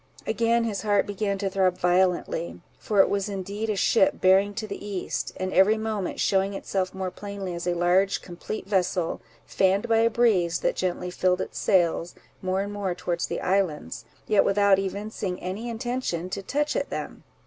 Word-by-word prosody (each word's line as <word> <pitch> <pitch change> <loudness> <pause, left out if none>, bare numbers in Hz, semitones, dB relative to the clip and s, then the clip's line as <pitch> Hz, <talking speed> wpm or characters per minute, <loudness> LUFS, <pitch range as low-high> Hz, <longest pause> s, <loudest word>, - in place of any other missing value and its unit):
Again 230 +1 +2
his 215 -3 -2
heart 205 -2 +2
began 205 0 -2
to 195 0 -2
throb 185 -1 +1
violently, 180 -2 +1 0.2
for 205 -2 +3
it - - +4
was 200 0 -1
indeed 200 +3 -4
a 210 - +1
ship 260 +8 +3
bearing 195 +2 +4
to 220 - -3
the 200 -1 -7
east, 200 -3 -3
and 185 0 -3
every 205 +4 +5
moment 215 -3 -3
shewing 195 0 +1
itself 190 -1 -2
more 190 -1 -3
plainly 200 -2 -6
as 170 +1 -5
a 175 - +1
large 180 +3 +2
complete 180 +4 -6
vessel, 185 -3 0 0.2
fanned 195 +4 +1
by 225 -1 +3
a 230 0 +4
breeze 200 -8 +2
that - - +1
gently 180 0 -2
filled 180 0 +1
its - - -5
sails, 175 -3 +1 0.3
more 185 +1 0
and 205 +1 -4
more 195 -3 -2
towards 175 -1 -2
the - - -3
islands, 155 - -1 0.2
yet 210 -2 +4
without 200 -1 +4
evincing 195 -1 -4
any 200 +6 -4
intention 230 -7 -3
to 195 - -3
touch 295 +8 -1
at - - -1
them. - - -6
195 Hz, 180 wpm, -26 LUFS, 180-210 Hz, 0.3 s, every